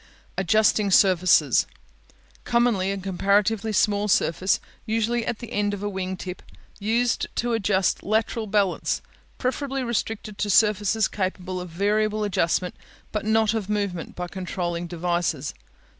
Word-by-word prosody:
Adjusting 210 +2 +3
Surfaces 185 -2 +4 0.8
Commonly 235 -6 +2
a 200 - -2
comparatively 200 +3 +1
small 205 0 +2
surface, 185 -1 +2 0.2
usually 225 +1 0
at 240 - -1
the 235 -1 -9
end 205 0 0
of 200 - -8
a 205 - -1
wing 190 -1 -4
tip, 180 0 -7 0.4
used 230 +3 +1
to 240 0 0
adjust 195 -3 +1
lateral 220 +1 0
balance; 200 -3 0 0.3
preferably 270 +1 -2
restricted 225 -3 -3
to 210 - -1
surfaces 210 +1 +3
capable 185 -1 -3
of 180 - -7
variable 210 +4 0
adjustment, 180 -2 0 0.4
but 210 -1 -3
not 220 0 +3
of 215 -3 -3
movement 200 -5 -2
by 180 0 -4
controlling 175 -2 -4
devices. 170 -4 -1
205 Hz, 130 wpm, -24 LUFS, 185-220 Hz, 0.8 s, Surfaces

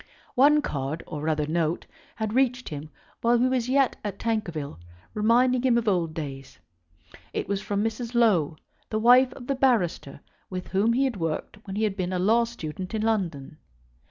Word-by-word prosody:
One 295 +3 +5
card, 140 +3 -3
or 150 -3 -6
rather 155 -1 0
note, 160 +1 -1 0.3
had 220 -1 -3
reached 255 -1 +1
him 150 0 -7 0.3
while 235 +1 +4
he 240 - +3
was 255 -2 0
yet 270 0 +3
at 200 -2 -4
Tankerville, 170 - -3 0.3
reminding 240 +4 +3
him 250 -2 +3
of 230 -1 -1
old 170 -5 +1
days. 135 -3 -7 0.8
It - - -2
was 200 0 -1
from 205 0 -1
Mrs. 225 +2 -3
Low, 180 -10 +3 0.3
the 215 - -1
wife 250 +3 +6
of 245 - -10
the 275 - 0
barrister 225 - 0 0.3
with 185 -1 -5
whom 205 +4 +2
he 260 +3 +2
had 260 -6 -1
worked 165 +4 -3
when 195 - -5
he 215 - 0
had 210 -3 0
been 185 -1 -2
a - - 0
law 225 +6 +3
student 185 -4 -6
in 215 - -1
London. 170 -10 -2
210 Hz, 185 wpm, -26 LUFS, 165-240 Hz, 0.8 s, wife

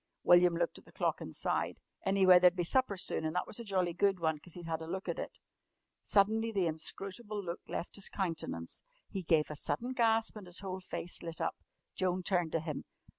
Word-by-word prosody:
William 175 -1 +6
looked 170 0 -1
at - - -22
the - - -17
clock - - -1
and - - -7
sighed. - - 0 0.3
Anyway, 190 -2 +7
there'd 180 0 +6
be 180 - 0
supper 210 +2 +2
soon, 180 - +1
and 155 +2 -2
that 180 - +1
was 215 - -6
a - - -5
jolly 185 -5 0
good 195 +1 +2
one, 160 -2 0
'cause 175 +2 -10
he'd 175 -1 -8
had 165 -1 -2
a 160 - -6
look 190 +3 -4
at - - -2
it. - - -6 0.7
Suddenly 220 +3 +3
the 195 -4 +1
inscrutable 195 +6 -4
look 170 -1 -4
left 175 - -3
his 200 - -1
countenance. 160 - -3 0.3
He 195 - -3
gave 160 -3 +2
a - - -5
sudden 195 - -1
gasp 225 -2 +2
and 200 -3 -9
his 175 +2 -1
whole 190 -1 -4
face 175 -1 -3
lit 165 -1 -5
up. 165 - -1 0.4
Joan 185 0 0
turned 175 -3 +1
to 165 - +1
him. 155 -3 -4
180 Hz, 220 wpm, -33 LUFS, 165-200 Hz, 0.7 s, Anyway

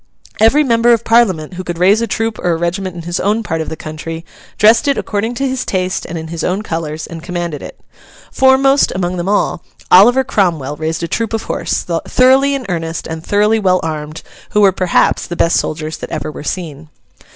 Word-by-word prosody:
Every 225 +8 +5
member 235 -2 +3
of 230 -1 0
Parliament 190 -9 +2
who 185 +1 -6
could 175 -2 -5
raise 195 +6 +4
a 230 - -1
troop 225 -1 -2
or 175 - 0
a - - 0
regiment 175 +2 -3
in 170 - -7
his 175 +1 -3
own 215 +3 0
part 165 -5 -2
of 160 - -4
the - - -5
country, 160 +2 -7 0.3
dressed 225 +7 +4
it 280 - +2
according 220 +3 -2
to 275 +3 -1
his 260 -1 -2
taste 185 -1 -2
and 170 - -5
in 160 0 -7
his 165 0 -5
own 190 +4 -1
colours, 160 -4 -4
and 165 -1 -9
commanded 175 -3 -4
it. - - -10 0.5
Foremost 270 +1 +4
among 180 0 -2
them 175 +2 -2
all, 205 - 0 0.3
Oliver 245 +8 +7
Cromwell 165 - 0
raised 160 +2 -3
a - - -1
troop 225 +6 -2
of 225 - -2
horse—thoroughly 260 +10 +1
in 265 -2 -5
earnest 165 -2 -3
and 160 0 -6
thoroughly 210 +3 +2
well 185 -3 +2
armed—who 155 +5 -5
were, 200 -2 +6
perhaps, 185 -1 +1
the 175 - -5
best 165 0 +2
soldiers 155 0 -4
that - - -7
ever 155 -1 -4
were 145 - -9
seen. 155 -2 -5
180 Hz, 205 wpm, -15 LUFS, 165-225 Hz, 0.5 s, Oliver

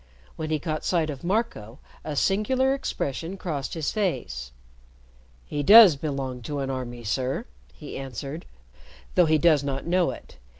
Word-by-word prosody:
When 155 -1 -4
he 155 - +1
caught 155 0 -4
sight 165 -4 +1
of 140 +1 -9
Marco, 175 - -2 0.3
a 150 - -4
singular 255 - +2
expression 170 - -3
crossed 150 -7 -4
his 160 -3 -1
face. 175 - -2 0.9
"He 145 - -3
does 205 +1 +9
belong 135 -3 -4
to 145 +5 -5
an 135 -1 -2
army, 120 -2 -5
sir," 130 - -2 0.3
he 150 - -8
answered, 135 +4 -6 0.7
"though 180 -2 +4
he 155 0 +4
does 155 -2 +4
not 135 -1 -3
know 180 0 +2
it. - - -9
150 Hz, 155 wpm, -25 LUFS, 135-180 Hz, 0.9 s, does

